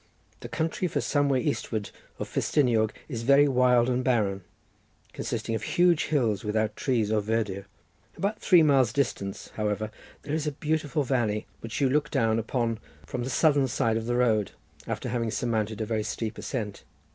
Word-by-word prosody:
The - - -8
country 165 +3 -1
for - - -1
some 145 -1 +1
way 130 -2 +2
eastward 110 -7 -2 0.3
of - - -4
Festiniog 115 -7 +2 0.2
is 120 -6 -4
very 140 +4 +5
wild 125 -2 +4
and 125 0 0
barren, 105 -7 +1 0.7
consisting 115 - -3
of 110 - -1
huge 175 +8 +3
hills 115 -9 +1
without 110 0 0
trees 115 -6 0
or 110 -1 +2
verdure. 105 -2 -2 0.5
About 205 +2 -1
three 175 -4 +5
miles' 135 -6 +4
distance, 110 -8 -2
however, 105 0 -1 0.3
there 145 - -4
is 155 -1 -1
a 150 - -1
beautiful 150 0 -1
valley, 115 -5 0
which 115 -1 -5
you 135 - +4
look 145 +3 +1
down 115 0 +2
upon 115 -1 -1 0.3
from 125 - -4
the 130 - -3
southern 145 +1 +3
side 115 -2 0
of 115 0 -2
the 120 - 0
road, 110 -5 +2 0.3
after - - -3
having 115 -1 -1
surmounted 110 -2 -1
a - - 0
very 110 0 -1
steep 110 +1 -4
ascent. 105 -7 -4
120 Hz, 175 wpm, -27 LUFS, 110-140 Hz, 0.7 s, very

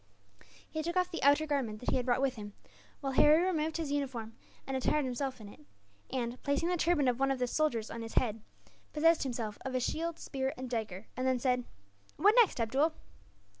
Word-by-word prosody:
He 315 - -4
took 340 +3 -2
off 365 0 +1
the 335 - -4
outer 285 +3 +5
garment 265 -8 -1
that 245 - -2
he - - +1
had 250 0 -2
brought 250 +2 +2
with 270 -2 +2
him, 205 -2 -8 0.5
while 275 -2 -2
Harry 300 +5 +6
removed 320 -4 0
his 315 -4 -3
uniform 255 -6 -3 0.3
and 270 - -3
attired 275 +2 +1
himself 255 0 -3
in 215 - -10
it 205 - -13 0.5
and, 245 -1 -3
placing 285 +4 0
the 360 - +2
turban 320 -4 +2
of 250 0 +1
one 270 0 +2
of 270 - 0
the 250 - 0
soldiers 245 -5 0
on 230 - -5
his 225 0 -7
head, 225 -3 +1 0.5
possessed 330 +2 +4
himself 235 -5 -3
of 265 -1 -4
a - - +2
shield, 330 +6 -2
spear, 265 -1 -3
and 255 -1 -6
dagger, 220 -4 -3
and 255 +1 -1
then 260 -1 +2
said: 250 0 0 0.5
"What 415 +3 +5
next, 460 - +5
Abdool?" 270 +8 +2
265 Hz, 210 wpm, -32 LUFS, 240-310 Hz, 0.5 s, Harry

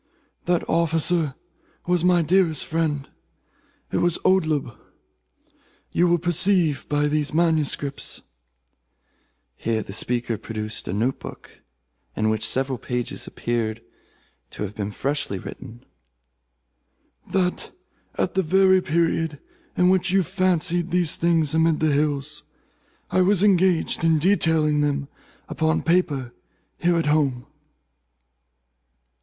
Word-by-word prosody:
That 175 -1 0
officer 165 -2 +1 0.5
was 175 -1 +1
my 175 -1 +4
dearest 170 -3 +2
friend. 155 -4 -1 0.8
It - - 0
was 175 -1 +2
Oldeb. 155 -9 +1 1.2
You 175 - +2
will 175 0 +3
perceive 175 -3 +1
by 145 0 +1
these 150 0 -1
manuscripts," 155 -4 -1 1.3
(here 110 -2 -2
the 95 - -9
speaker 120 0 -1
produced 110 -1 -5
a - - -2
note 120 +6 0
book - - -11 0.5
in 110 0 +1
which 110 0 -2
several 130 -1 -1
pages 125 +2 -4
appeared 115 -2 -2 0.7
to - - -6
have 105 0 -5
been 100 -1 -4
freshly 135 -2 -2
written,) 115 +5 -10 1.5
"that 180 -2 -1 0.5
at - - -1
the 190 - +2
very 190 +2 +4
period 165 -2 0 0.4
in 180 0 +4
which 190 0 +2
you 190 +1 +3
fancied 175 -2 0
these 175 -2 +2
things 165 -3 +1
amid 160 -1 +2
the 155 -1 +2
hills, 145 0 -1 0.7
I 185 - +3
was 190 +1 +3
engaged 185 -5 +2
in 165 -1 +4
detailing 160 -4 +2
them 140 -1 -1 0.4
upon 160 0 0
paper 145 -8 0 0.5
here 175 0 +2
at 165 - 0
home." 140 -5 +1
160 Hz, 115 wpm, -23 LUFS, 140-175 Hz, 1.5 s, my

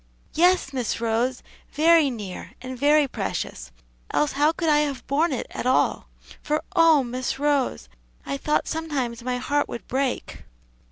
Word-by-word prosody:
"Yes, 350 -4 +3
Miss 250 -5 -2
Rose, 235 +2 -1 0.3
very 320 0 +5
near, 210 -7 -7
and 255 0 -7
very 290 +3 +4
precious; 65 - -4 0.4
else 295 - +1
how 295 +3 +3
could 330 0 -3
I 300 -1 +5
have 285 -3 -2
borne 300 +5 +1
it 260 - -2
at - - -3
all? 260 - +1 0.3
for 305 +1 -1
oh, 325 -5 +6
Miss 255 +2 -3
Rose, 285 -2 0 0.4
I 275 - -3
thought 300 +2 0
sometimes 275 -7 -3
my 250 +1 -2
heart 290 +3 0
would 235 - -7
break!" 265 0 -2
275 Hz, 155 wpm, -24 LUFS, 250-300 Hz, 0.4 s, oh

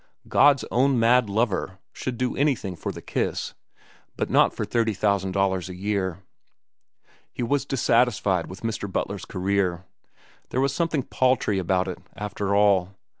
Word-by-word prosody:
God's 140 -1 +4
own 130 +2 +3
mad 115 0 +4
lover 100 -3 -1 0.2
should 125 -2 -4
do 125 +1 -1
anything 130 -10 0
for - - -4
the - - -10
kiss, - - -2 0.6
but - - -2
not - - +5
for - - -4
thirty 110 0 0
thousand 95 -1 0
dollars 95 -2 0
a 90 - -7
year. 95 -2 -2 1.1
He - - -4
was 140 +3 0
dissatisfied 115 -8 +2
with 95 +2 -10
Mr. 110 -3 -3
Butler's 100 0 -3
career. 95 -2 -1 0.6
There 130 - -1
was 135 +1 +1
something 165 -5 0
paltry 125 -7 +1
about 95 +1 0
it, 90 - -5 0.2
after 100 -1 -2
all. 100 -2 +3
105 Hz, 150 wpm, -25 LUFS, 95-125 Hz, 1.1 s, not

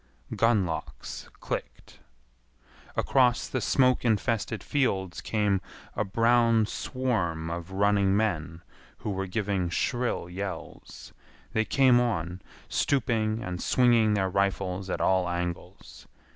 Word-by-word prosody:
Gun 115 -4 +3
locks 80 -2 -6
clicked. - - -6 1.0
Across 125 -2 +2
the 130 - -2
smoke 130 +3 +3
infested 115 -1 0
fields 95 -11 -1
came 105 -3 0 0.3
a - - +1
brown 115 +1 +3
swarm 95 -11 -2
of 85 +1 -5
running 100 0 +2
men 85 -6 -2 0.3
who 105 - -4
were 95 0 -3
giving 95 -2 -1
shrill 120 +2 -1
yells. 95 +2 -7 0.4
They 110 0 +1
came 130 -1 +4
on, 90 -7 -1 0.3
stooping 115 -4 0
and 90 -4 -4
swinging 115 -4 +3
their 95 -2 +1
rifles 95 -1 -1
at - - -2
all 95 -1 +2
angles. 85 0 -6
100 Hz, 115 wpm, -27 LUFS, 90-115 Hz, 1.0 s, came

